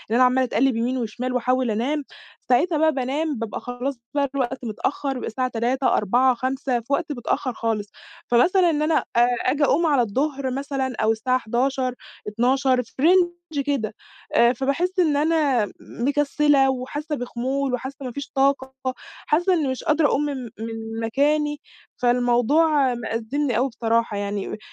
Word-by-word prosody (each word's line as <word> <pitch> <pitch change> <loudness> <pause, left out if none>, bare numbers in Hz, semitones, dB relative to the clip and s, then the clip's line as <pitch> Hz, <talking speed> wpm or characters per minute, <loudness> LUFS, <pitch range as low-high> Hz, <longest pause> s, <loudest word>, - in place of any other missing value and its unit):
أنا 255 - +5
عمالة 255 +1 +4
اتقلب 260 +1 +1
يمين 240 +3 -1
وشمال 250 +2 -3
وأحاول 255 0 +1
أنام، 270 +8 -1 0.5
ساعتها 305 +7 +3
بقى 315 +1 +4
بانام، 280 +3 -1
بابقى 225 -2 -4
خلاص 245 +3 -4 0.2
بقى 280 -1 +1
الوقت 255 -2 -2
متأخر 270 +5 -2
الساعة 255 +1 -2
03:00، 250 +3 0
04:00، 245 +6 +3
05:00 260 +1 -1
في 235 +4 -5
وقت 310 +1 -1
متأخر 255 -1 -2
خالص. 220 -3 -2 0.4
فمثلًا 345 +9 +4
إن 300 -2 0
أنا، 310 +1 +2 0.2
آآ، 240 +1 +5 0.2
أجي 285 +3 +2
أقوم 320 +4 +3
على 285 -5 +3
الظهر 265 +4 -1
مثلًا 270 -1 -3
أو 220 0 +3
الساعة 255 +3 +1
11:00، 255 +2 -1 0.3
12:00 255 +4 +2
في 230 - -23
رينج 350 +3 +5 0.4
كده، 250 -7 -1 0.4
آآ 235 +1 +5
فباحس 325 +9 -1
إن 310 -5 +3
أنا 290 -8 +2
مكسلة 285 +1 +2
وحاسة 290 +4 -3
بخمول 260 +2 -2
وحاسة 265 +2 -5
ما 250 - -4
فيش 280 +3 -7
طاقة، 270 -1 +1 0.5
حاسة 350 +5 +2
إن 310 -6 +1
مش 260 - -4
قادرة 305 -1 +3
أقوم 290 +1 +1
من 275 -3 -3
من 225 0 -6
مكاني، 295 +6 +1 0.4
فالموضوع 250 +4 +3
مأزمني 235 +3 -2
أوي 260 +3 +1
بصراحة 230 -2 0
يعني. 200 0 -3
260 Hz, 155 wpm, -23 LUFS, 240-285 Hz, 0.5 s, أنا